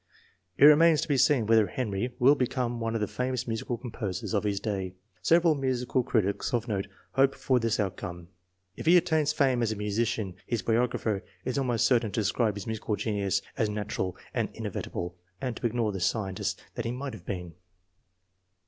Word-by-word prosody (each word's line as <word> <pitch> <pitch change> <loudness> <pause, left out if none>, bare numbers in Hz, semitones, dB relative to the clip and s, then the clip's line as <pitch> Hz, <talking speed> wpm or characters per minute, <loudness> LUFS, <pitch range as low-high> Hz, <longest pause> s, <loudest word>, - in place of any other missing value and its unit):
It - - +7
remains 155 +1 +7
to - - -3
be 145 - +2
seen 130 -3 +4
whether 110 -1 +4
Henry 105 +2 -2
will 135 +2 +6
become 125 -3 -1
one 115 0 -2
of 115 - -1
the 105 - +1
famous 125 0 -2
musical 115 +1 -2
composers 110 -6 -4
of 105 0 +1
his 100 -1 0
day. 95 -3 -3 0.3
Several 170 -1 +4
musical 130 -2 0
critics 110 -2 0
of 120 +1 -2
note 100 -3 -2 0.2
hope 135 0 +3
for 130 -2 +1
this 115 -2 0
outcome. 90 -3 -4 0.5
If - - -7
he 175 +2 +8
attains 160 -3 +2
fame 135 -5 +2
as 115 -2 +1
a - - -2
musician, 105 -2 -1
his 115 -5 -1
biographer 115 -2 0 0.2
is 130 +2 -1
almost 125 -4 +1
certain 120 -5 +3
to - - 0
describe 105 +1 +1
his 100 - -6
musical 110 -1 -2
genius 100 -2 -1
as 110 -5 +1
natu 105 0 -4
ral 95 -1 -1 0.2
and - - 0
inevitable, 90 +1 -5 0.2
and 125 +1 -3
to 120 - 0
ignore 115 -2 0
the 95 - -4
scientist 95 0 -1
that 120 - -4
he 115 - -1
might 135 +2 -5
have 95 -5 -11
been. 90 -3 -4
115 Hz, 190 wpm, -28 LUFS, 100-125 Hz, 0.5 s, he